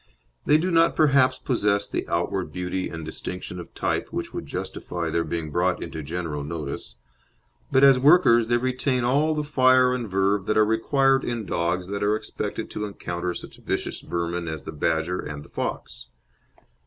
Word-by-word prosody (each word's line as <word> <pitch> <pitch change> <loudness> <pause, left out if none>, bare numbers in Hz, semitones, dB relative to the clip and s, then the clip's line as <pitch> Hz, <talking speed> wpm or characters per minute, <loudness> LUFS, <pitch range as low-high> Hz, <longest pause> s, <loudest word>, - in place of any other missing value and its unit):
They 150 - +6
do 180 +4 -1
not 165 0 +4
perhaps 135 -4 +4
possess 105 -6 0
the - - -3
outward 85 0 -1
beauty 90 +2 -3
and 80 -1 -7
distinction 90 +2 -6
of 85 - -9
type - - -1
which - - -5
would - - -5
justify 85 -2 -4
their 85 +1 +1
being 80 -2 -4
brought 90 +3 +1
into 80 - -6
general 80 -1 -4
notice, 80 +1 -5 0.8
but 130 - +4
as 135 -2 +7
workers 130 -6 +5
they 120 0 +3
retain 130 +1 0
all 145 +6 +2
the 150 - -1
fire 130 -3 +4
and 120 -4 -3
verve 95 +1 +1
that 110 - +1
are 110 - +6
required 135 +5 +2
in 120 -3 -3
dogs 85 +1 -1
that 100 0 -3
are 105 +1 +2
expected 110 - -5
to 105 - -3
encounter 90 -3 -4
such - - -9
vicious - - -3
vermin 85 0 -3
as 80 -3 -5
the - - -6
badger 80 +3 0
and 75 -1 -6
the - - -17
fox. - - -5
100 Hz, 180 wpm, -25 LUFS, 85-130 Hz, 0.8 s, as